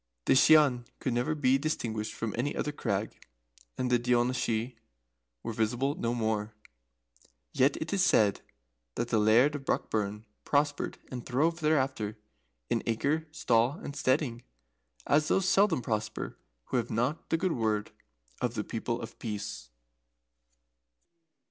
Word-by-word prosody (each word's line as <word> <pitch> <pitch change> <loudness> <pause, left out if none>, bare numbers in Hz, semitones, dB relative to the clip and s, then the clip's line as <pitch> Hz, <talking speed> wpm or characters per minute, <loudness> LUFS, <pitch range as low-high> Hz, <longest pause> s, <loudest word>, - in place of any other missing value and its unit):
The - - +4
Shian 130 -3 +5
could 130 - -2
never 125 +6 0
be 135 -2 +3
distinguished 115 -8 -3
from 115 -2 -3
any 130 +5 -1
other 150 - -1
crag, 110 -7 -3 0.6
and 125 -1 -1
the 120 - +4
Daoiné 120 +1 +2
Shi 120 0 -1 0.7
were 115 - -3
visible 120 +6 0
no 120 -4 -2
more. 110 -2 -1 1.0
Yet 135 +2 +3
it 155 +3 -4
is 195 -2 +3
said 105 - +3 0.5
that 120 - -2
the 115 - +2
Laird 115 +7 +5
of 145 -2 -5
Brockburn 105 -2 -1 0.2
prospered 145 0 0
and 125 -2 -5
throve 160 +7 +1
thereafter, 130 -9 0 0.5
in - - 0
acre, 145 +8 0
stall, 120 -4 +2
and 145 -2 -8
steading, 130 -4 0 0.6
as 150 +1 +3
those 190 -1 +2
seldom 190 -7 +3
prosper 110 -1 -3 0.3
who - - +1
have 120 -1 -1
not 125 +8 -1
the 165 - +2
good 185 +2 0
word 110 -2 -1 0.5
of 125 -1 -1
the 105 - -1
People 115 +2 -3
of 115 - -9
Peace. 105 - -5
125 Hz, 140 wpm, -30 LUFS, 110-145 Hz, 1.0 s, Shian